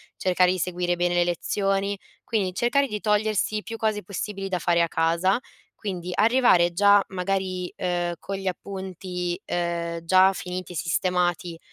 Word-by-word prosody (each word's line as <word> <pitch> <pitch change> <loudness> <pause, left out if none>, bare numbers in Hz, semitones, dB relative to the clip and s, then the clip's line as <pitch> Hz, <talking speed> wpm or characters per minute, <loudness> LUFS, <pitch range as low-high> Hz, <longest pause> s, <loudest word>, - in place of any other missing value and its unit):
cercare 180 -1 +2
di 185 - -1
seguire 175 0 -1
bene 175 0 0
le 175 - +3
lezioni, 195 +3 -1 0.2
quindi 195 -6 -1
cercare 250 +6 +2
di 210 -2 -4
togliersi 215 0 +1
più 225 - -7
cose 215 -2 -1
possibili 195 +1 -4
da 185 -1 -1
fare 170 0 +2
a 170 - +3
casa, 170 +6 +2 0.4
quindi 180 -4 -5
arrivare 215 -6 +4
già 200 +2 +5
magari, 185 -1 -2
ehm, 175 -1 -1
con 195 0 -5
gli 195 - -5
appunti, 185 -2 -4
ehm, 170 -1 -2
già 185 +2 +6
finiti 180 -1 -6
e - - -8
sistemati, 175 +1 0
185 Hz, 155 wpm, -25 LUFS, 175-200 Hz, 0.4 s, già